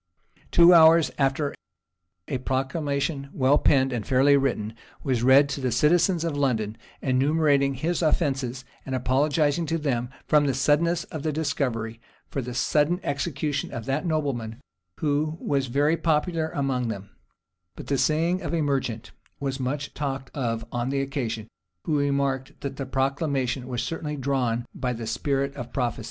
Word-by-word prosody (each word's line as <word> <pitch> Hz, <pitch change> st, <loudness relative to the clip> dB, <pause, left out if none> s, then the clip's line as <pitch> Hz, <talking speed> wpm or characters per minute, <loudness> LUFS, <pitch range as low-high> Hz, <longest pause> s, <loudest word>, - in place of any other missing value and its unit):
[*] -, -, -32 dB
Two 175 Hz, +1 st, +7 dB
hours 165 Hz, -1 st, +7 dB
after, 140 Hz, +1 st, +1 dB, 0.7 s
a 130 Hz, -, -2 dB
proclamation, 140 Hz, +2 st, -2 dB
well 135 Hz, +2 st, +3 dB
penned, 135 Hz, -2 st, +3 dB
and 115 Hz, -3 st, -2 dB
fairly 135 Hz, +4 st, +4 dB
written, 120 Hz, -6 st, 0 dB, 0.3 s
was 130 Hz, -5 st, 0 dB
read 135 Hz, +3 st, +6 dB
to 140 Hz, 0 st, -3 dB
the 130 Hz, -1 st, 0 dB
citizens 170 Hz, -, +3 dB
of 165 Hz, -3 st, -2 dB
London, 115 Hz, -7 st, 0 dB, 0.3 s
enumerating 140 Hz, +1 st, +2 dB
his 165 Hz, +7 st, -1 dB
offenses, 135 Hz, -6 st, 0 dB, 0.2 s
and 130 Hz, -, -3 dB
apologizing 145 Hz, +5 st, +1 dB
to 165 Hz, -, 0 dB
them, 125 Hz, -6 st, -1 dB, 0.2 s
from 150 Hz, -2 st, +3 dB
the 135 Hz, -, 0 dB
suddenness 160 Hz, +5 st, +2 dB
of 155 Hz, -, -4 dB
the 155 Hz, -, -1 dB
discovery, 115 Hz, -7 st, -2 dB, 0.3 s
for 135 Hz, -, -2 dB
the 125 Hz, 0 st, -6 dB
sudden 150 Hz, +6 st, +2 dB
execution 145 Hz, 0 st, -2 dB
of 115 Hz, -2 st, -6 dB
that 135 Hz, +4 st, -1 dB
nobleman, 135 Hz, -9 st, -2 dB, 0.4 s
who 155 Hz, +1 st, 0 dB
was 140 Hz, -2 st, 0 dB
very 145 Hz, +6 st, +2 dB
popular 160 Hz, 0 st, 0 dB
among 135 Hz, -4 st, -1 dB
them; 100 Hz, -3 st, -6 dB, 0.6 s
but -, -, -9 dB
the 140 Hz, -, 0 dB
saying 165 Hz, +4 st, +1 dB
of -, -, -2 dB
a 165 Hz, -, +1 dB
merchant 130 Hz, -5 st, -2 dB, 0.3 s
was 135 Hz, -1 st, -3 dB
much 140 Hz, +3 st, -3 dB
talked 135 Hz, -2 st, -4 dB
of 115 Hz, -5 st, -2 dB
on 120 Hz, +1 st, -2 dB
the 140 Hz, 0 st, 0 dB
occasion, 125 Hz, -5 st, -3 dB, 0.4 s
who 155 Hz, -, 0 dB
remarked, 140 Hz, -2 st, -1 dB
that 135 Hz, -1 st, -5 dB
the 135 Hz, -, -4 dB
proclamation 135 Hz, -1 st, -1 dB
was 125 Hz, -3 st, -2 dB
certainly 150 Hz, -2 st, -4 dB
drawn 125 Hz, -4 st, 0 dB
by 125 Hz, -1 st, -2 dB
the 115 Hz, -1 st, -6 dB
spirit 140 Hz, +4 st, -1 dB
of 120 Hz, -3 st, -7 dB
prophecy. 125 Hz, -2 st, -1 dB
140 Hz, 160 wpm, -25 LUFS, 130-150 Hz, 0.7 s, Two